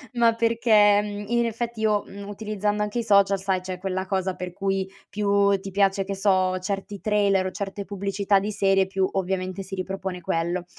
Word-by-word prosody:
ma 235 -1 +4
perché, 225 -3 +4
mhmm, 205 0 -5
in 235 0 +2
effetti 230 0 -3
io, 215 -1 +2
mhmm, 200 0 -9
utilizzando 210 0 -2
anche 210 +3 -2
i - - -1
social, 200 -2 +4
sai 190 -1 0
c'è 185 0 -5
quella 190 0 -2
cosa 190 -1 -1
per 180 0 -6
cui, 195 +1 -1 0.2
più 200 -1 +2
ti 195 0 -7
piace 195 0 +2
che 195 +1 -4
so, 185 -2 +2
certi 195 +1 -4
trailer 200 -2 +2
o 185 - -2
certe 200 0 -5
pubblicità 200 0 0
di 205 +2 -3
serie, 195 -2 +3
più 190 0 0
ovviamente 190 0 -2
si 190 +1 -7
ripropone 190 -1 -4
quello 170 +1 -2
195 Hz, 190 wpm, -25 LUFS, 190-205 Hz, 0.2 s, ma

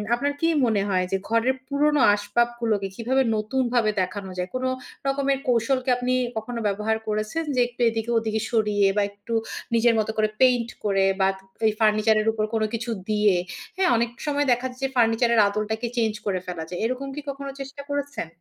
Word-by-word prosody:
আপনার 285 +4 -1
কি 330 - +3 0.2
মনে 220 -4 +2
হয় 185 -1 +1
যে 195 - +2
ঘরের 230 +3 +2
পুরনো 290 +1 +2
আসবাবগুলোকে 225 -1 0
কিভাবে 260 +4 +1
নতুনভাবে 235 0 +1
দেখানো 190 +1 -4
যায়? 180 +1 -2
কোন 255 - -2 0.4
রকমের 275 0 +1
কৌশল 245 +2 +2
কি - - -1
আপনি 250 0 0 0.2
কখনো 230 +2 -4
ব্যবহার 210 +2 0
করেছেন 215 +9 -1
যে 250 - +3
একটু 245 0 -10
এদিকে 225 +1 -3
ওদিকে 220 -1 -1
সরিয়ে 210 -3 +2
বা - - +4
একটু 205 +3 -8 0.4
নিজের 230 +1 +4
মত 215 - 0
করে 215 0 +2
পেইন্ট 245 -2 +4
করে 195 -2 +2
বা 190 - +4 0.4
এই 215 - +2
ফার্নিচার 215 0 +4
এর 215 - -3
উপর 215 -1 -1
কোন 220 -1 +1
কিছু 230 +1 -3 0.2
দিয়ে, 210 -3 +3 0.4
হ্যাঁ? 375 -1 +3
অনেক 235 +1 +1 0.2
সময় 290 -1 +1
দেখা 245 +1 +1
যায় 250 - -11
যে - - +3
ফার্নিচারের 235 0 +3
আদলটাকে 215 +3 -2
চেঞ্জ 225 -2 +2
করে 195 -3 0
ফেলা 175 -3 -4
যায় 175 - -5
এরকম 255 +3 -2
কি 295 - -4
কখনো 275 0 -5
চেষ্টা 275 +1 -7
করেছেন? 285 - -3
230 Hz, 185 wpm, -24 LUFS, 215-255 Hz, 0.4 s, বা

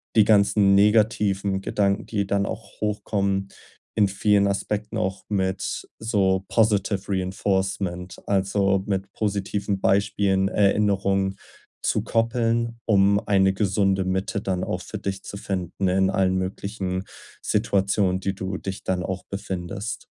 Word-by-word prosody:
die 110 - +7
ganzen 100 -1 +4
negativen 100 -2 +3
Gedanken, 100 0 0
die 100 -3 -1
dann 100 0 +1
auch 110 +2 -7
hochkommen 100 -2 -1 0.5
in 105 -2 +4
vielen 100 0 +3
Aspekten 105 +2 -2
auch 95 -3 -2
mit 95 -2 -2
so 95 -4 +1
Positive-Reinforcement, 95 -3 0
also 100 0 +1
mit 95 -1 -2
positiven 100 -1 -2
Beispielen 100 -1 +2
Erinnerungen 100 -1 +2 0.5
zu - - +1
koppeln, 115 0 0
um 100 -1 +4
eine 95 -1 +4
gesunde 95 -1 +1
Mitte 95 +2 -1
dann 95 -2 -2
auch - - -2
für - - -6
dich 95 0 -4
zu - - -8
finden 95 -1 -3
in 95 +1 +2
allen 95 -1 +2
möglichen 95 0 -3 0.4
Situationen, 95 -1 +1
die 95 0 -1
du 95 0 -4
dich 95 0 -6
dann 90 -1 0
auch 95 +1 -4
befindest. 95 +2 -5
100 Hz, 125 wpm, -24 LUFS, 95-105 Hz, 0.5 s, die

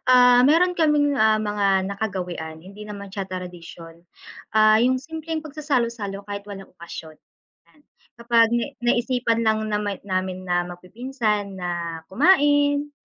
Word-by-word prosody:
Ah, 250 -1 +7
meron 355 +4 +4
kaming, 300 -3 +2
ah, 220 0 +4
mga 200 -3 +1
nakagawian, 180 -6 -4
hindi 200 +3 -12
naman 200 -1 -8
siya 195 -1 -5
tradisyon, 175 -2 -9 0.5
ah, 215 0 +6
yung 255 +1 +2
simpleng 320 +2 -5
pagsasalo-salo 235 -10 -2
kahit 205 0 -5
walang 195 -1 -9
okasyon, 165 -2 -9 0.6
yan. 300 - -27 0.4
Kapag 235 -1 +3
na 240 - +1 0.2
naisipan 240 -1 +1
lang 220 0 +3
naman 205 -2 -2
namin 185 -1 -2
na 175 0 +1
magpipinsan 210 +3 -3
na 170 -2 -4
kumain, 290 - +3
215 Hz, 130 wpm, -23 LUFS, 185-255 Hz, 0.6 s, Ah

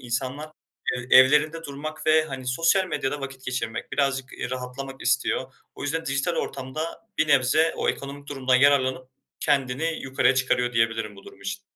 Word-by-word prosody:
insanlar 130 +5 -3 0.4
ev 125 0 -5
evlerinde 150 +5 +6
durmak 155 +2 -6
ve, 155 0 +5
hani, 130 -4 -7
sosyal 165 +8 +3
medyada 145 -3 -2
vakit 135 -1 -7
geçirmek, 125 -3 -4
birazcık, 135 -2 0
eee, 125 - -5
rahatlamak 130 +1 -6
istiyor. 125 0 0 0.2
O - - -9
yüzden 165 +3 -2
dijital 140 +6 0
ortamda 155 +10 -4
bir 155 - +2
nebze 140 +4 +4
o - - -1
ekonomik 140 +1 -4
durumdan 130 -2 0
yararlanıp 130 -2 +3 0.3
kendini 145 +3 0
yukarıya 130 -1 +2
çıkarıyor 125 -1 +1
diyebilirim 115 -2 0
bu 100 - -14
durum 100 - -14
için. 100 0 -5
135 Hz, 160 wpm, -25 LUFS, 125-150 Hz, 0.4 s, evlerinde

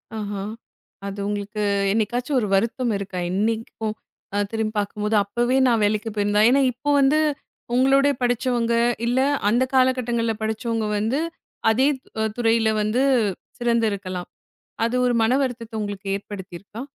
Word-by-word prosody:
ஆஹா. 205 -2 -4 0.7
அது, 200 0 -6
உங்களுக்கு 210 +1 -3 0.3
என்னைக்காச்சு 240 +5 -1
ஒரு 210 - -1
வருத்தம் 235 +4 0
இருக்கா? 195 -2 -5
இன்னிக்கும் 220 +1 -1 0.4
அ - - +1
திரும்பிப் 220 -1 -2
பாக்கும்போது. 210 +1 -1
அப்பவே 240 +6 0
நான் 230 -3 +3
வேலைக்குப் 215 +1 0
போயிருந்தா 205 0 +2
ஏனா, 275 +2 +4
இப்போ 255 +5 -5
வந்து 280 +3 +4 0.6
உங்களோடே 275 +2 +4
படிச்சவங்க, 245 -1 +1 0.3
இல்ல 245 +2 +1 0.3
அந்த 240 +4 +3
கால 260 -1 +5
கட்டங்கள்ல 235 -2 0
படிச்சவங்க 220 +1 -1
வந்து, 225 +7 0 0.5
அதே 260 +5 +3 0.5
துறையில 225 -1 +3
வந்து 215 +5 +1 0.6
சிறந்து 235 -2 +2
இருக்கலாம். 185 -3 -5 0.6
அது 235 - -3
ஒரு 245 - +2
மனவருத்தத்த 245 -2 0
உங்களுக்கு 205 -1 -5
ஏற்படுத்தியிருக்கா? 200 +2 -8
225 Hz, 125 wpm, -23 LUFS, 205-245 Hz, 0.7 s, கால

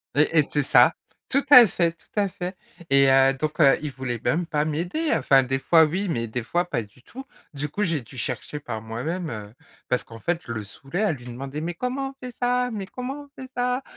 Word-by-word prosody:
Et 155 +2 +3
et - - +5
c'est 145 -1 0
ça, 125 -3 +5 0.4
tout 275 +1 +2
à 250 -5 +10
fait, 170 -3 +1
tout - - -27
à 200 -1 +2
fait. 180 +1 -6 0.3
Et 135 0 +5
heu, 135 0 +5
donc, 150 +4 -4
heu, 140 -3 +6
il 150 -2 -4
voulait 125 -3 -4
même 170 +2 +1
pas 150 -3 0
m'aider. 175 - -2
Enfin, 135 -3 +4
des 135 +1 -1
fois, 165 +3 +5
oui, 185 +6 0
mais 115 -7 -1
des 120 +3 -3
fois, 175 +9 0
pas 120 - -2
du 105 +4 -20
tout. 265 +2 -10 0.3
Du 145 +1 -3
coup, 205 +8 -2
j'ai 165 -6 0
dû 120 +3 -13
chercher 125 +4 -4
par 115 -6 -5
moi-même, 155 +10 -4
heu, 105 -2 -7 0.4
parce 125 - +1
qu'en 115 -1 -12
fait, 170 +4 -1
je - - -5
le 110 -1 -4
saoulais 135 - -6
à 215 - +2
lui 125 -6 -7
demander: 135 +4 -6
«Mais 170 +2 -3
comment 255 +7 -3
on - - -12
fait 250 - -6
ça? 250 0 +1
Mais 200 -3 -4
comment 265 +5 -6
on 275 - -14
fait 260 - -9
ça?» 250 +2 0
155 Hz, 240 wpm, -24 LUFS, 130-200 Hz, 0.4 s, à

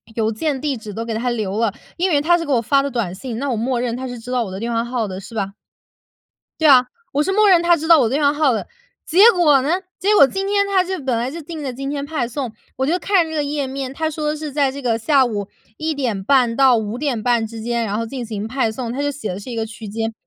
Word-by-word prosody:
邮 220 -1 +1
件、 275 +4 -2
地 285 -1 -1
址 215 -2 -8
都 225 +3 -5
给 230 - -3
它 240 +3 -1
留 215 -3 -2
了。 230 -3 +2 0.3
因 370 +2 +1
为 295 -4 +3
它 345 +4 +3
是 335 - -3
给 290 - -3
我 240 - +4
发 275 +4 +3
的 280 - -2
短 230 -8 -2
信， 230 +3 -6
那 275 +1 -2
我 - - 0
默 240 +2 -1
认 240 -1 -1
它 260 +1 -5
是 245 -1 -6
知 245 +2 -9
道 250 -2 +1
我 190 - -7
的 190 - -6
电 235 +1 -3
话 230 0 +1
号 240 -3 -2
的， 190 0 -6
是 225 +3 -11
吧？ 195 -2 -1 1.1
对 315 - +4
啊， 265 -3 +9 0.3
我 290 +2 +2
是 385 - -1
默 425 +1 +4
认 350 -3 +6
它 345 0 +5
知 320 +1 -5
道 330 -2 +8
我 230 - +3
电 290 +3 0
话 285 0 +4
号 295 -3 +2
的。 220 - -2 0.4
结 395 +8 +7
果 300 - +4
呢， 290 - -1 0.3
结 410 +3 +2
果 280 - +8
今 385 +8 -3
天 400 0 +2
它 380 -2 +2
就 375 0 -3
本 255 -3 0
来 240 +3 -1
就 335 +3 -7
定 315 0 -7
的 265 -3 -3
今 275 +2 -5
天 285 0 -3
派 285 -5 -2
送， 245 -2 -4 0.2
我 265 - 0
就 350 +4 +1
看 375 -4 +2
这 320 - -6
个 300 - 0
页 285 -1 -2
面， 265 0 -4
它 315 +1 -1
说 300 0 -2
是 300 -2 -6
在 280 -2 +2
这 280 +1 -8
个 230 -2 +1
下 270 +2 +3
午 205 -4 -3 0.3
1:30 255 -5 +1
到 265 -2 +5
5:30 235 0 0
之 225 0 -8
间， 235 0 -1
然 205 +1 -2
后 230 - -1
进 245 +1 -5
行 215 -1 -5
派 240 -1 0
送， 235 +1 -5
它 270 - -4
就 290 0 0
写 275 -6 -6
的 190 - -6
是 250 - -9
一 235 - -5
个 225 - -1
区 215 -1 -9
间。 225 +2 -3
260 Hz, 295 characters per minute, -20 LUFS, 230-300 Hz, 1.1 s, 啊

